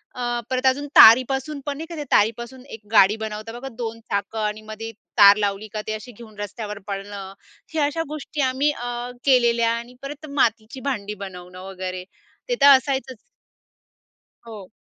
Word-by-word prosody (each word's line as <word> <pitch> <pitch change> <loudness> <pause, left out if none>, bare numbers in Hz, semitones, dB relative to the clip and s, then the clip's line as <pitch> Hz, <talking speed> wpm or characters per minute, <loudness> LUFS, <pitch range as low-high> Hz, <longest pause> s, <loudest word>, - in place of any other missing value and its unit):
अ, 240 -1 -2
परत 255 0 -1
अजून 280 +3 +2
तारीपासून 265 +5 +6
पण 285 -1 -3
नाही 320 - -6
का, 335 - -7
ते 300 - -4
तारीपासून 235 +4 +1
एक 220 - -15
गाडी 205 -1 +6
बनवता, 220 0 -6
बघा 270 - -7
2 230 -1 -5
चाकं 200 +2 -2
आणि 210 +1 -2
मध्ये 220 +1 -7 0.3
तार 200 -1 +9
लावली 205 +1 -2
का 215 - -3
ते 215 - -2
अशी 215 +3 -7
घेऊन 220 -2 -14
रस्त्यावर 205 0 -6
पळणं. 195 -1 -6 0.4
हे 315 - -1
अशा 300 +3 0
गोष्टी 300 0 -5
आम्ही 265 +3 +1
अ, 245 -1 -5
केलेल्या 235 -3 +4
आणि 235 +2 -8
परत 290 +2 -8
मातीची 230 0 0
भांडी 210 -5 -3
बनवणं 180 -1 -10
वगैरे, 185 -1 -5 0.5
ते - - +1
तर 285 - +8
असायचंच. 265 -2 -4 1.3
हो. 210 -5 -10
230 Hz, 165 wpm, -23 LUFS, 210-260 Hz, 1.3 s, तार